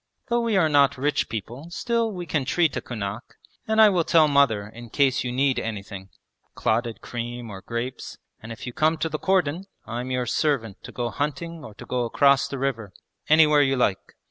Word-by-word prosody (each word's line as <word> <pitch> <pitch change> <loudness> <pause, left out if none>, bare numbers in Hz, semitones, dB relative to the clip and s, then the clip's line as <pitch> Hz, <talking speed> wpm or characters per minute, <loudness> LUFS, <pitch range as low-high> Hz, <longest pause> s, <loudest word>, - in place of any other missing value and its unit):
Though 240 0 +2
we 230 -3 +1
are 170 -4 +4
not 140 -2 +3
rich 145 +2 0
people 120 - -6
still 230 +5 -1
we 180 -3 -6
can 155 -4 -1
treat 160 +3 +1
a - - -2
kunak, 110 -1 -6 0.3
and 220 0 +1
I 215 -1 +8
will 180 -4 +2
tell 160 -1 +4
mother 140 -8 +2
in 115 +2 -11
case 135 +1 +2
you 125 - -3
need 135 +1 +1
anything 100 -3 -6 0.5
clotted 115 +1 -1
cream 120 -1 -6
or 95 -1 -8
grapes 115 +4 -5 0.2
and 110 - -9
if 115 - -8
you 125 - -6
come 160 +4 +2
to 160 +1 -2
the 155 0 -4
cordon 185 -2 +1 0.2
I'm 120 +2 -5
your 125 -1 -1
servant 120 -6 -1
to - - -9
go 120 -1 -3
hunting 150 +3 -4
or 110 - -11
to - - -11
go 125 -1 -1
across 140 +3 +3
the 140 - -5
river, 115 -7 -3 0.4
anywhere 150 -1 +6
you 135 -1 +2
like! 105 -7 -1
135 Hz, 200 wpm, -24 LUFS, 115-155 Hz, 0.5 s, I